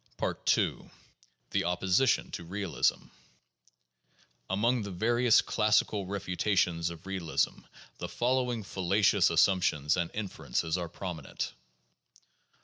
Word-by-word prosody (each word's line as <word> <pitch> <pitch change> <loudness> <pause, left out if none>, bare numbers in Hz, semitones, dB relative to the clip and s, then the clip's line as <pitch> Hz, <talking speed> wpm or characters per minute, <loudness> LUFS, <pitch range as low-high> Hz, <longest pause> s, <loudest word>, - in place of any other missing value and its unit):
II. - - -2 0.6
The - - +1
Opposition 95 +8 +2
to - - -6
Realism. 95 -1 -1 1.4
Among 115 +6 +1
the 100 - -5
various 115 +5 +3
classic 110 -1 +2
refu 100 -2 -4
tations 90 -5 +1
of 85 0 -10
realism 95 -4 -1 0.4
the - - -5
following 125 -2 0
fallacious 95 +1 +2
assumptions 85 -3 +2
and 85 -2 -1
inferences 80 - -2
are 85 -2 -3
prominent. 85 -7 -5
95 Hz, 100 wpm, -30 LUFS, 85-105 Hz, 1.4 s, various